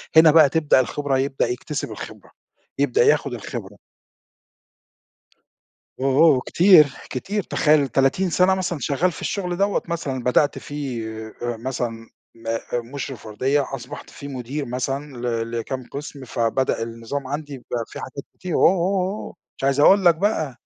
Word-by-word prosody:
هنا 160 0 +8
بقى 155 -2 +7
تبدأ 150 -2 +3
الخبرة، 135 +2 0
يبدأ 135 0 0
يكتسب 135 +4 -4
الخبرة، - - -9 0.5
يبدأ 140 -4 +3
ياخد 140 -2 +2
الخبرة. 105 -3 -7 2.2
أوه، 135 0 +1
أوه! 145 -6 +5
كتير، 175 -4 +7 0.2
كتير، 200 +10 -3
تخيل 150 -4 +3
30 135 +9 +2
سَنة 185 +3 +3
مثلًا 180 -4 -2
شغّال 165 +6 +1
في - - -10
الشُغل 180 -3 -2
دَوّة، 200 +1 +1
مثلًا 140 -7 -3
بدأت 135 +4 +2
فيه 135 -6 -5 0.3
آآ، 120 -1 -2
مثلًا 115 -2 -4 0.3
م 115 0 -18 0.5
مُشرف 135 -5 -6
وردية، 130 +7 +1
وأصبحت 130 -3 -7
فيه 140 - -10
مدير 135 +2 -4
مثلًا 135 +3 -4
ل 115 -1 -2
لكام 125 +3 -4
قِسم، 140 -1 -7
فبدأ 115 +1 0
النظام 115 +4 -5
عندي 145 +1 -5
يبقى 120 -2 -4
فيه - - -9
حاجات 135 +2 -7 0.2
كتير 180 -2 -4
أوه، - - +3
أوه، 185 +1 0
أوه 215 - -8 0.2
!مش - - -10
عايز 135 +1 +2
أقول 190 +6 +6
لك 170 -1 +7
بقى. 160 - -1
140 Hz, 150 wpm, -22 LUFS, 125-160 Hz, 2.2 s, هنا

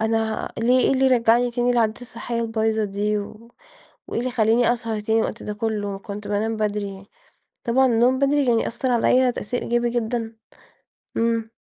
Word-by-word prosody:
أنا 220 0 -1
ليه 245 +3 +3
إيه - - +3
اللي 265 0 +3
رجعني 240 -1 +3
تاني 245 +1 +1
لعاداتى 230 -1 0
الصحية 235 0 -4
البايظة 220 -1 0
دي، 210 +1 -1
و 215 +3 -9 0.6
وإيه - - -2
اللي 255 +1 -2
خلّاني 235 0 +3
أسهر 225 -3 -3
تاني 220 +2 +1
الوقت 220 - -3
ده 210 - -4
كلّه؟ 205 -2 -3
كنت 205 +1 -8
بانام 220 +2 -1
بدري." 205 -2 -3 0.6
طبعًا 260 +3 +3
النوم 245 +2 +3
بدري 280 +1 +2
يعني 230 -2 +2
أثر 250 +2 -2
عليّ 250 +2 +3
تأثير 245 +2 -4
إيجابي 240 0 0
جدًا. 230 -1 -2 0.8
امم. 230 -1 0
230 Hz, 165 wpm, -23 LUFS, 215-245 Hz, 0.8 s, ليه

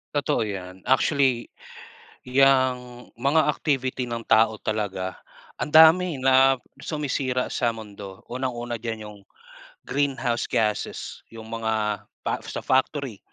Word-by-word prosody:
Totoo 145 -1 +1
yan 95 -2 -7
actually, 130 -2 +2 0.8
yang 130 -2 +2
mga 140 +6 +2
activity 130 -4 -1
ng 115 -1 -5
tao 110 -1 +4
talaga, 95 -4 -3 0.4
ang - - -3
dami 160 0 +6
na 135 0 +5 0.2
sumisira 135 -4 -1
sa 120 - 0
mundo, 100 -4 -10
unang-una 120 -2 -4
diyan 110 -1 -5
yung 105 -1 -11 0.6
greenhouse 135 -4 -1
gasses, 105 -2 -2
yung 110 0 -10
mga 110 -3 -2 0.2
pa - - -1
sa - - -5
factory, 130 -4 0
125 Hz, 115 wpm, -24 LUFS, 110-135 Hz, 0.8 s, dami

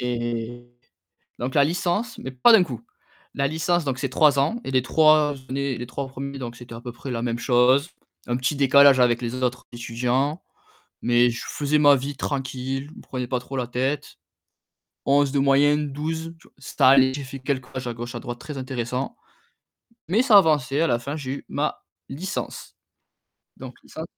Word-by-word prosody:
et 120 0 -4 0.7
donc 125 +3 -4
la 145 - +6
licence, 175 +9 -1
mais 130 - -7
pas 130 - +5
d'un 220 -5 +7
coup. 125 -9 -7 0.5
La 140 0 +1
licence 160 +2 0
donc 130 -2 -2
c'est 135 - -2
3 140 +1 +4
ans 155 +13 0
et 135 - -5
les 130 - +3
3 155 +1 +4
années, 135 -1 -2
les 120 0 -6
3 140 +2 -5
premiers 135 +1 -7
donc 120 -2 -6
c'était 120 -1 -11
à 115 - -9
peu 120 - -7
près 130 +3 -8
la 115 -1 -3
même 120 -1 -2
chose. 130 +5 +3 0.4
Un 120 - 0
petit 130 +4 -1
décalage 140 -1 +6
avec 120 -1 +3
les 120 -1 -3
autres 125 0 -2
étudiants, 125 +6 -2 0.6
mais 120 0 +3
je 115 - -6
faisais 150 +1 0
ma 145 -1 +7
vie 140 +1 -4
tranquille, 135 0 -3
je - - -16
me - - -11
prenais 125 -1 -5
pas 125 -1 -1
trop 125 +2 -9
la 125 -2 -2
tête. 130 +4 -3 0.9
11 140 0 +3
de 140 - +1
moyenne, 145 +2 +3
12 160 +3 -4 0.2
c'est - - -10
allé, 130 0 +6
j'ai 140 - -5
fait 135 +1 -8
quelques 130 -1 -4
à 120 - -3
gauche 120 +1 -7
à - - -4
droite, 120 0 -7
très 150 -2 -8
intéressant. 130 - -4 1.0
Mais 215 +6 +4
ça 225 -6 +7
avançait, 150 -5 +2
à - - +3
la 120 - +2
fin 140 +5 -5
j'ai 140 -4 -6
eu 140 - -6
ma - - -2 0.2
licence. 180 +8 -6 0.8
Donc - - -9
ça - - -7
135 Hz, 190 wpm, -24 LUFS, 125-145 Hz, 1.0 s, d'un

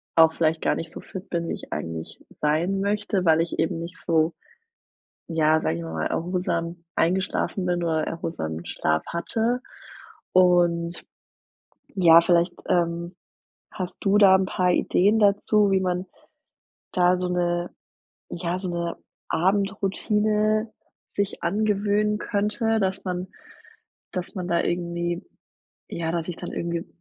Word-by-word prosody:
auch 160 -1 +6
vielleicht 160 0 +1
gar - - +2
nicht 165 0 -6
so - - -8
fit 190 +1 -9
bin, 170 -1 -2
wie - - -1
ich - - -9
eigentlich 80 +1 -6 0.2
sein 170 +6 +1
möchte, 205 -2 0
weil 160 -1 +5
ich 165 - -3
eben 165 - 0
nicht 170 +2 -7
so, 165 -1 +2 1.0
ja, 160 -1 +3
sage 80 - -1
ich 85 - -5
mal 80 -1 -6
mal 80 -1 -1
erholsam 170 -1 -2
eingeschlafen 185 +1 0
bin 175 -1 0
oder 160 -2 +1
erholsamen 85 - -4
Schlaf 80 0 0
hatte, 225 +8 -1 0.7
und, 175 -2 +3 0.9
ja 170 -3 +7
vielleicht, 175 +1 +2
ähm, 170 0 0 0.6
hast 185 -3 -5
du 200 0 +2
da 195 -2 +8
'n 190 0 0
paar 185 -1 +1
Ideen 205 +5 +3
dazu, 205 0 +3
wie 190 -1 +3
man 180 0 -1 0.9
da 180 0 +4
so 180 0 -2
'ne 175 0 0 0.6
ja, 175 +1 -2
so 185 - -4
'ne 170 -1 -3 0.3
Abendroutine 210 +3 +1 0.4
sich 200 0 -2
angewöhnen 210 +2 +1
könnte, 210 +2 0
dass 190 0 -1
man 180 0 -3 0.8
dass 180 -2 -5
man 180 -3 -4
da 170 -1 +2
irgendwie 175 +1 -2 0.6
ja, 165 -1 -3
dass 170 -1 -2
ich 175 - -4
dann 175 - -6
irgendwie 170 0 -3
175 Hz, 140 wpm, -25 LUFS, 170-195 Hz, 1.0 s, da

